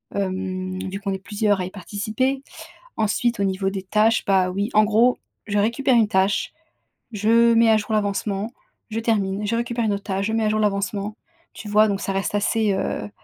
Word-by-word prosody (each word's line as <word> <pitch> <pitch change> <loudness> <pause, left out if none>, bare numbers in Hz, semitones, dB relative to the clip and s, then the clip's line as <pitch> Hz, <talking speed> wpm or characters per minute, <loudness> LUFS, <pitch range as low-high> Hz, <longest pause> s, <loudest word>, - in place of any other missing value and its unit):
hem, 185 -1 -3
vu 195 +1 -5
qu'on 200 -1 -3
est 190 - -4
plusieurs 205 -1 0
à - - -2
y - - -5
participer. 215 +8 -2 0.6
Ensuite, 225 +2 0
au 200 - +1
niveau 195 0 0
des 195 -1 -5
tâches, 215 +4 +2
bah 190 -2 +3
oui, 200 +3 -2
en 215 - +6
gros, 225 +4 +3 0.3
je 205 -1 -1
récupère 235 +5 +2
une 225 -2 +4
tâche, 195 -1 +1 0.6
je 230 +3 +4
mets 230 0 +5
à 220 - +5
jour 215 +1 -4
l'avancement, 205 +1 -1 0.4
je 225 +1 -2
termine, 210 -3 0
je 230 - 0
récupère 235 0 -1
une 205 - +1
autre 200 - -4
tâche, 195 0 -2
je 220 - -2
mets 225 0 +1
à 215 - +2
jour 215 - 0
l'avancement. 205 0 -1 0.4
Tu 215 - -9
vois, 215 +1 +5
donc 200 -1 -1
ça 195 - -2
reste 195 +1 -2
assez, 210 0 +1
heu, 105 - -3
205 Hz, 205 wpm, -22 LUFS, 195-225 Hz, 0.6 s, en